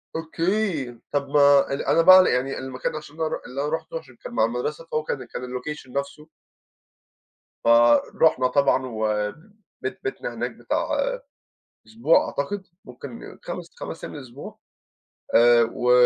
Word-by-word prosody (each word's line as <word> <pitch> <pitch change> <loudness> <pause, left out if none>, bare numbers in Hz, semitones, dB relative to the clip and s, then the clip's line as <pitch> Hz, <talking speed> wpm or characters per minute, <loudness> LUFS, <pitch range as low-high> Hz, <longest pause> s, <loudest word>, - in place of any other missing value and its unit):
أوكي، 165 - -1
طب 140 -1 -1
ما 140 -1 +5
أن 140 - -2
أنا 165 - +3
بقى 185 +2 +8
يعني 130 +2 -1
المكان 130 +1 -4
عشان 155 -1 -9
أنا 160 0 -1
رُح - - -4
اللي 130 +3 -4
أنا 145 - -1
رُحته 160 +1 -3
عشان 130 -5 -18
كان - - -10
مع 110 - +3
المدرسة، 125 +8 -3
فهو 155 -2 -2
كان 135 -4 -4
كان 125 - -7
اللوكيشن 125 +2 -6
نفسه 140 +2 -5 1.3
فرُحنا 120 +4 +4
طبعًا، 135 0 +2
وبيت 125 - -4
بيتنا 400 - -4
هناك - - -3
بتاع - - -2 1.0
أسبوع 220 -7 +3
أعتقد، 190 +8 -3 0.2
ممكن 125 0 -10
خمس - - -7
خمس - - -8
أيّام - - -7
لأسبوع. 130 -1 -10 0.8
آآ، 120 0 +6
و 125 0 +1
140 Hz, 140 wpm, -24 LUFS, 125-160 Hz, 1.3 s, بقى